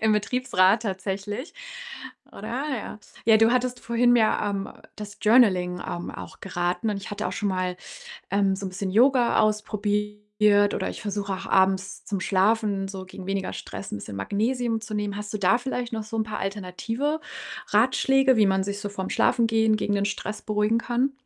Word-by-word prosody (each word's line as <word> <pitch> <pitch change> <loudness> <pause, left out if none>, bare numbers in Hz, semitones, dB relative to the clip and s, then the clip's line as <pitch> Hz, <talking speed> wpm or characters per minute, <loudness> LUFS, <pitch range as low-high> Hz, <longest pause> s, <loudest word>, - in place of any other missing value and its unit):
im 220 -1 +3
Betriebsrat 210 -2 +2
tatsächlich, 200 - -4 0.8
oder? - - -8 0.2
Ja. 225 -5 -4 0.3
Ja, 220 -1 +6
du 225 +1 +5
hattest 250 0 0
vorhin 240 +1 +3
ja, 220 -2 +2
ähm, 195 -1 -3 0.3
das 210 -1 -8
Journaling, 185 -6 +4
ähm, 175 - -4
auch - - -10
geraten 180 +3 -2
und 205 - -2
ich 200 - -8
hatte 205 +1 -3
auch - - -4
schon 205 - -1
mal, 185 -1 -1 0.5
ähm, 195 -1 +2
so 195 - -5
'n - - -3
bisschen 190 +1 -4
Yoga 245 +3 +4
ausprobiert 210 -1 +1
oder - - -2
ich - - -7
versuche 200 -1 -3
auch - - -7
abends 190 0 +1
zum 200 -4 -2
Schlafen 200 0 +1
so 190 -1 -7
gegen 185 0 -10
weniger 195 -1 -2
Stress 195 - -7
'n - - -2
bisschen 100 0 -8
Magnesium 225 - -1
zu 220 -1 -7
nehmen. 205 -1 -2
Hast 210 0 -6
du - - -1
da 200 +5 +3
vielleicht 250 -2 -4
noch 220 -1 -3
so 220 +1 -6
'n 220 - +2
paar 215 0 -5
alternative 225 - -3 0.5
Ratschläge, 260 +3 +3
wie 210 -2 +5
man 190 0 +2
sich 200 0 -4
so 205 - -3
vorm 190 -2 -5
Schlafengehen 225 -2 +3
gegen 205 -1 -1
den 200 0 +1
Stress 210 +1 -4
beruhigen 210 +1 +1
kann? 245 +4 0
210 Hz, 185 wpm, -25 LUFS, 195-225 Hz, 0.8 s, Ja